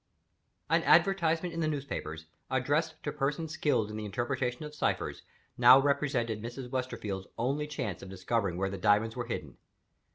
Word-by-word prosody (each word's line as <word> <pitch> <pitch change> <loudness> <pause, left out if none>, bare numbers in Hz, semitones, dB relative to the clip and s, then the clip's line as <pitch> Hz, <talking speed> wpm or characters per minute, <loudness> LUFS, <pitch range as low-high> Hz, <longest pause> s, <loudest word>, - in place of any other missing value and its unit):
An - - +3
advertisement 175 -3 +3
in 165 - -4
the 160 - +1
newspapers, 130 - -4 0.2
addressed 145 +5 0
to 150 - -2
persons 150 +2 -2
skilled 125 -10 +1
in 105 - -5
the 110 - -4
interpretation 125 +4 -2
of 150 - -8
ciphers, 150 - -1 0.4
now 130 - +9
represented 135 -6 0
Mrs. 120 +2 -7
Westerfield's 110 -7 -3
only 140 +6 0
chance 125 - -4
of 95 - -9
discovering 95 0 -1
where 95 +1 -1
the 100 - -5
diamonds 105 +3 +3
were 120 -1 -3
hidden. 120 - -5
125 Hz, 160 wpm, -30 LUFS, 105-150 Hz, 0.4 s, now